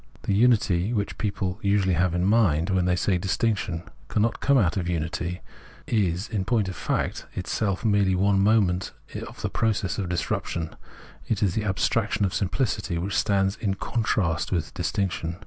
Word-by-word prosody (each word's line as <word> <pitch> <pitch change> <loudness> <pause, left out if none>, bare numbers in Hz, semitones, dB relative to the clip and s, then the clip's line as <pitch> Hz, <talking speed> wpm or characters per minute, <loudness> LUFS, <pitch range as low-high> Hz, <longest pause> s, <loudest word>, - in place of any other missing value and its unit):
The - - 0
unity 105 -3 +3
which 100 -3 -2
people 100 -2 -2
usually 100 -2 +2
have 90 +1 +1
in 90 +1 +1
mind 95 -6 +3
when 95 -2 +2
they 90 0 +2
say 90 0 +1
distinction 95 -2 -1 0.2
cannot 110 +2 0
come 140 -1 +3
out 90 -9 +2
of 90 -3 -2
unity, 85 +1 -2 0.4
is, 95 -4 0
in 100 -3 -2
poiut 110 -1 +1
of 95 - -5
fact, - - -2
itself 100 +2 -2
merely 100 -3 +3
one 100 +1 +3
moment 95 -3 +2 0.3
of - - -11
the - - 0
process 105 -5 0
of 95 -3 -2
disruption; 85 -1 -2 0.5
it 110 -2 0
is 95 -4 +2
the 110 - -1
ab 95 -2 0
straction 110 -1 0
of 95 - +1
simpHcity, 105 -3 -1
which 90 +2 -2
stands 95 -1 +2
in 100 -3 -1
contrast 100 -7 0
with 80 -5 -1
dis 90 -1 -2
tinction. 90 -4 -2
95 Hz, 175 wpm, -25 LUFS, 90-105 Hz, 0.5 s, unity